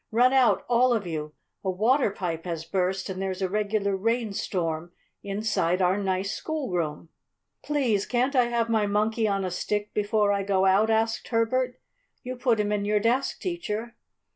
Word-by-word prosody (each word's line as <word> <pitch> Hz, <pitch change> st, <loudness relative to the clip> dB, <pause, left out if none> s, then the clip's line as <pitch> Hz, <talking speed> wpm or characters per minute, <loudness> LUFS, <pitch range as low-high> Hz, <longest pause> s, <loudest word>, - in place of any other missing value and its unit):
Run 245 Hz, +4 st, +4 dB
out, 260 Hz, -2 st, +3 dB
all 245 Hz, +1 st, +4 dB
of 220 Hz, -4 st, -1 dB
you. 155 Hz, -3 st, -5 dB, 0.3 s
A 190 Hz, -, -1 dB
water 225 Hz, +8 st, +2 dB
pipe 175 Hz, -4 st, -4 dB
has 165 Hz, -2 st, -4 dB
burst 185 Hz, 0 st, -1 dB
and 190 Hz, 0 st, -5 dB
there's 190 Hz, 0 st, -2 dB
a -, -, +2 dB
regular 205 Hz, 0 st, 0 dB
rain 225 Hz, +2 st, 0 dB
storm 170 Hz, -3 st, -2 dB, 0.3 s
inside 200 Hz, -3 st, 0 dB
our 185 Hz, 0 st, +3 dB
nice 195 Hz, 0 st, -1 dB
schoolroom." 180 Hz, -, -3 dB, 0.5 s
"Please 250 Hz, -9 st, 0 dB
can't 255 Hz, +3 st, +1 dB
I 250 Hz, -2 st, +5 dB
have 235 Hz, -1 st, 0 dB
my 220 Hz, -2 st, +1 dB
Monkey 215 Hz, +2 st, +1 dB
on 195 Hz, -2 st, 0 dB
a 185 Hz, -, -3 dB
Stick 210 Hz, +3 st, -2 dB
before 210 Hz, 0 st, +2 dB
I 200 Hz, -, 0 dB
go 195 Hz, -1 st, +1 dB
out?" 195 Hz, +3 st, +4 dB
asked 225 Hz, 0 st, +1 dB
Herbert. 250 Hz, +2 st, 0 dB, 0.4 s
"You 255 Hz, +1 st, -5 dB
put 245 Hz, -3 st, +1 dB
him 210 Hz, 0 st, 0 dB
in 205 Hz, -1 st, 0 dB
your 210 Hz, +1 st, +2 dB
desk, 240 Hz, +5 st, 0 dB
Teacher!" 235 Hz, -, -4 dB
210 Hz, 175 wpm, -26 LUFS, 190-235 Hz, 0.5 s, I